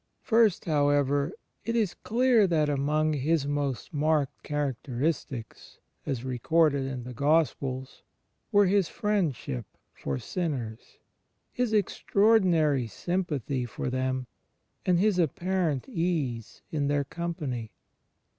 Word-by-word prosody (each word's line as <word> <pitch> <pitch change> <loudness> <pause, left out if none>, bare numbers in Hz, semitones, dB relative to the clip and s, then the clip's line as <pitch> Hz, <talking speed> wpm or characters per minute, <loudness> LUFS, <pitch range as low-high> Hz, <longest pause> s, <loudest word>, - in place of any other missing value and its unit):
First, 225 -5 +3
however, 145 -2 +2 0.3
it 230 - -2
is 215 -6 +1
dear 235 -2 +4
that 155 -4 +2
among 150 +2 +1
His 150 +1 +1
most 145 +2 -2
marked 150 -1 +1
characteristics, 135 -3 -3 0.3
as 130 -5 -2
recorded 140 +3 +2
in 130 -2 -5
the 125 +1 -7
Gospels, 140 -2 0 0.5
were 205 0 +6
His 195 -1 +2
Friendship 170 - -1 0.3
for 70 -1 -3
sinners. 125 - -4 0.5
His 250 -3 -1
extraordmary 185 - +3
sym 180 - -1
pathy 135 -5 -3
for 125 - -3
them, 130 0 -1 0.6
and 180 -1 +4
His 195 0 +2
apparent 170 -2 0
ease 165 - -2
in 145 -3 0
their 145 0 +1
com 170 +4 -4
pany. 125 - -4
150 Hz, 115 wpm, -28 LUFS, 130-180 Hz, 0.6 s, were